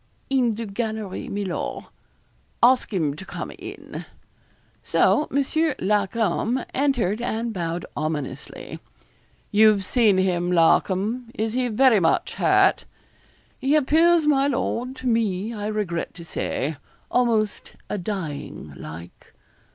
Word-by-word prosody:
'In 245 Hz, -5 st, +2 dB
the 230 Hz, +1 st, -4 dB
gallery, 215 Hz, -1 st, -4 dB
mi 200 Hz, 0 st, -3 dB
lor.' 180 Hz, -, -4 dB, 0.7 s
'Ask 250 Hz, +1 st, +5 dB
him 155 Hz, -8 st, 0 dB
to 170 Hz, -, -8 dB
come -, -, -6 dB
in.' -, -, -8 dB, 0.8 s
So 300 Hz, -, +2 dB
Monsieur 295 Hz, +2 st, +1 dB
Larcom 210 Hz, +4 st, 0 dB
entered, 245 Hz, -7 st, +1 dB
and 230 Hz, -1 st, -2 dB
bowed 170 Hz, -2 st, -3 dB
ominously. 150 Hz, -2 st, -5 dB, 0.7 s
'You've 210 Hz, -2 st, +5 dB
seen 215 Hz, -2 st, +3 dB
him, 180 Hz, -2 st, +1 dB
Larcom. 195 Hz, +7 st, +2 dB
Is 220 Hz, 0 st, -1 dB
he 250 Hz, 0 st, +1 dB
very 240 Hz, -1 st, +4 dB
much 165 Hz, -2 st, +1 dB
hurt?' -, -, +4 dB, 0.7 s
'He 275 Hz, +3 st, +2 dB
appears, 320 Hz, +3 st, +4 dB
my 280 Hz, -2 st, +3 dB
lord, 255 Hz, -1 st, -2 dB
to 260 Hz, -, -10 dB
me, 220 Hz, -2 st, 0 dB
I 210 Hz, -2 st, -4 dB
regret 205 Hz, -6 st, -2 dB
to 170 Hz, -1 st, -10 dB
say, 150 Hz, -2 st, -3 dB, 0.3 s
almost 225 Hz, -4 st, +1 dB
a 205 Hz, -, -3 dB
dying 165 Hz, -, -5 dB
like.' 80 Hz, +4 st, -11 dB
215 Hz, 120 wpm, -24 LUFS, 180-245 Hz, 0.8 s, Ask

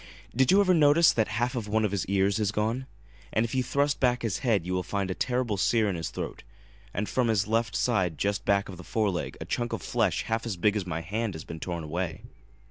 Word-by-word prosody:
Did 130 Hz, +1 st, +3 dB
you 195 Hz, -, +6 dB
ever 185 Hz, -2 st, +4 dB
notice 160 Hz, +1 st, +6 dB
that 110 Hz, -2 st, +1 dB
a -, -, -8 dB
half 120 Hz, +4 st, 0 dB
of 115 Hz, -4 st, -3 dB
one 110 Hz, +1 st, +1 dB
of 105 Hz, -, -1 dB
his 100 Hz, -3 st, -2 dB
ears 100 Hz, +1 st, +2 dB
is 105 Hz, -1 st, +1 dB
gone? 115 Hz, +5 st, -1 dB, 0.4 s
And 110 Hz, -, +2 dB
if 115 Hz, -, -6 dB
you 130 Hz, -, +2 dB
thrust 140 Hz, +3 st, 0 dB
back 125 Hz, -2 st, +2 dB
his 105 Hz, -4 st, -1 dB
head 110 Hz, -10 st, +1 dB
you 90 Hz, -, -2 dB
will 90 Hz, -, +1 dB
find 95 Hz, +1 st, -2 dB
a -, -, 0 dB
terrible 125 Hz, -2 st, -1 dB
sear 110 Hz, +3 st, +2 dB
in 100 Hz, -, -1 dB
his 80 Hz, -2 st, -3 dB
throat, -, -, -6 dB, 0.5 s
and 100 Hz, +2 st, -2 dB
from 125 Hz, +4 st, +1 dB
his 105 Hz, -3 st, +2 dB
left 115 Hz, +2 st, 0 dB
side 95 Hz, -10 st, +1 dB
just 100 Hz, +4 st, -1 dB
back 100 Hz, 0 st, +2 dB
of 95 Hz, -, -8 dB
the 90 Hz, -, -10 dB
fore 105 Hz, 0 st, 0 dB
leg 90 Hz, -, -4 dB
a -, -, -6 dB
chunk 120 Hz, -1 st, -2 dB
of 100 Hz, -8 st, -4 dB
flesh -, -, 0 dB
half 115 Hz, 0 st, -1 dB
as 100 Hz, -5 st, -3 dB
big 105 Hz, +4 st, +2 dB
as 100 Hz, -4 st, -2 dB
my 85 Hz, -1 st, -3 dB
hand 105 Hz, +3 st, -3 dB
has 80 Hz, -, -7 dB
been 80 Hz, -, -8 dB
torn 85 Hz, 0 st, -4 dB
away. 80 Hz, +1 st, -4 dB
105 Hz, 260 wpm, -28 LUFS, 95-120 Hz, 0.5 s, you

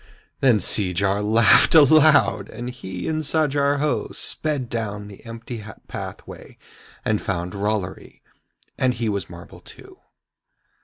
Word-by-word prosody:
Then 125 Hz, -5 st, +4 dB
Seejar 100 Hz, +1 st, +1 dB
laughed 110 Hz, +8 st, +5 dB
aloud, 155 Hz, 0 st, +5 dB
and 120 Hz, +1 st, -7 dB
he 95 Hz, -8 st, -7 dB
and 155 Hz, 0 st, -1 dB
Sajar 145 Hz, -2 st, +1 dB
Ho 150 Hz, +1 st, -1 dB
sped 145 Hz, -5 st, -2 dB
down 105 Hz, -3 st, -4 dB
the 100 Hz, -1 st, -13 dB
empty 115 Hz, -1 st, -8 dB, 0.2 s
pathway -, -, -9 dB, 0.5 s
and 110 Hz, -1 st, 0 dB
found 90 Hz, -2 st, -4 dB
Rollory, 100 Hz, -2 st, -4 dB, 0.6 s
and 130 Hz, -1 st, +1 dB
he 115 Hz, -1 st, -2 dB
was 100 Hz, -5 st, -3 dB
marble 85 Hz, 0 st, -12 dB
too. -, -, -16 dB
115 Hz, 120 wpm, -22 LUFS, 100-140 Hz, 0.6 s, laughed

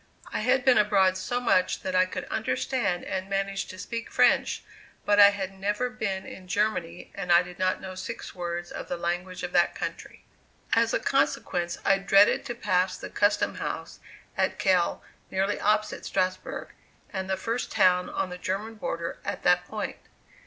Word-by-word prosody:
I -, -, 0 dB
had 255 Hz, +4 st, +2 dB
been 260 Hz, -4 st, +6 dB
abroad 195 Hz, -3 st, +4 dB
so 245 Hz, +6 st, -2 dB
much 185 Hz, -7 st, +2 dB
that 185 Hz, -, -2 dB
I 185 Hz, 0 st, +4 dB
could -, -, -5 dB
understand 200 Hz, -9 st, -1 dB
and 190 Hz, 0 st, -3 dB
manage 195 Hz, 0 st, -1 dB
to 185 Hz, -, -9 dB
speak 230 Hz, +4 st, -5 dB
French, -, -, +3 dB, 0.4 s
but 205 Hz, 0 st, +4 dB
I 200 Hz, 0 st, +10 dB
had 195 Hz, -1 st, -4 dB
never 210 Hz, +6 st, -1 dB
been 200 Hz, -6 st, -3 dB
in 185 Hz, -1 st, -10 dB
Germany 185 Hz, -4 st, -1 dB
and 180 Hz, -3 st, -3 dB
I 170 Hz, +1 st, +7 dB
did 180 Hz, 0 st, -11 dB
not 185 Hz, 0 st, +1 dB
know 190 Hz, -1 st, -7 dB
six 190 Hz, +5 st, -6 dB
words 175 Hz, -1 st, -4 dB
of -, -, -6 dB
the 180 Hz, -, -3 dB
language 175 Hz, +2 st, -3 dB
of 180 Hz, -, -3 dB
that 175 Hz, -1 st, +3 dB
country. -, -, -6 dB, 0.5 s
As -, -, +3 dB
a -, -, +1 dB
consequence, 175 Hz, -1 st, 0 dB
I 195 Hz, 0 st, +4 dB
dreaded 195 Hz, +1 st, +4 dB
to 240 Hz, -, -4 dB
pass 185 Hz, -4 st, +1 dB
the -, -, -8 dB
custom 205 Hz, 0 st, +2 dB
house -, -, -5 dB, 0.4 s
at -, -, 0 dB
Kehl, 185 Hz, -3 st, +2 dB, 0.3 s
nearly 195 Hz, +2 st, 0 dB
opposite 215 Hz, +1 st, +1 dB
Strasbourg, 185 Hz, -1 st, -2 dB, 0.4 s
and 190 Hz, -1 st, -3 dB
the 190 Hz, -, 0 dB
first 230 Hz, +2 st, -3 dB
town 180 Hz, -1 st, +3 dB
on 185 Hz, -, -2 dB
the 180 Hz, -, -7 dB
German 200 Hz, +5 st, -3 dB
border 170 Hz, -3 st, -4 dB
at -, -, -4 dB
that 180 Hz, 0 st, +4 dB
point. 215 Hz, -1 st, -4 dB
190 Hz, 180 wpm, -27 LUFS, 180-205 Hz, 0.5 s, I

